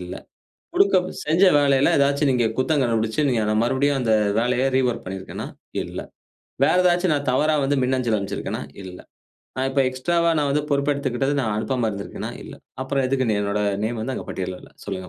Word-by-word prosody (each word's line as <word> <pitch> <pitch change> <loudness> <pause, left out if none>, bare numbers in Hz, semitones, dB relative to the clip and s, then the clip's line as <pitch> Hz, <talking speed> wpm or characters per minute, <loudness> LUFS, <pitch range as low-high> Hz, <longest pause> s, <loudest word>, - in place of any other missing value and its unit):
இல்ல. 90 0 -7 0.6
கொடுக்கப் 190 -2 +4 0.2
செஞ்ச 160 +5 +3
வேலையில 140 -1 +3
ஏதாச்சும் 140 0 +2
நீங்க 120 -2 +2
குத்தம் 140 +2 +1
கண்டுபிடிச்சு, 115 +2 0
நீங்க 120 -4 +1
நான் 110 +1 +2
மறுபடியும் 135 +3 +1
அந்த 115 -3 +1 0.3
வேலைய 125 +2 +1
ரீவொர்க் 125 -2 0
பண்ணியிருக்கேனா? 95 0 -6 0.4
இல்ல. - - -7 0.7
வேற 160 - +3
ஏதாச்சும் 175 -1 +3
நான் 145 -2 -2
தவறா 155 +4 +2
வந்து 140 +1 +1
மின்னஞ்சல் 125 -3 +1
அனுப்பிச்சிருக்கேனா? 100 -1 -4 0.2
இல்ல. 90 -1 -9 0.6
நான் 130 +1 0
இப்ப 135 +1 +1
எக்ஸ்ட்ராவா 170 +7 +1
நான் 145 -1 +1
வந்து 150 +2 +1
பொறுப்பு 140 +1 +2
எடுத்துக்கிட்டது 135 -1 -1
நான் 110 -5 -1
அனுப்பாம 120 +1 -1
இருந்திருக்கேனா? 100 -1 -6
இல்ல. - - -10 0.3
அப்புறம் 135 0 -1
எதுக்கு 130 -1 0
என்னோட 100 0 -1 0.2
நேம் 115 +1 -2
வந்து 130 +4 -3
அங்கு - - -6
பட்டியல்ல 90 -1 -4
இல்ல? - - -15
சொல்லுங்க. 95 -2 -5
130 Hz, 175 wpm, -23 LUFS, 110-145 Hz, 0.7 s, கொடுக்கப்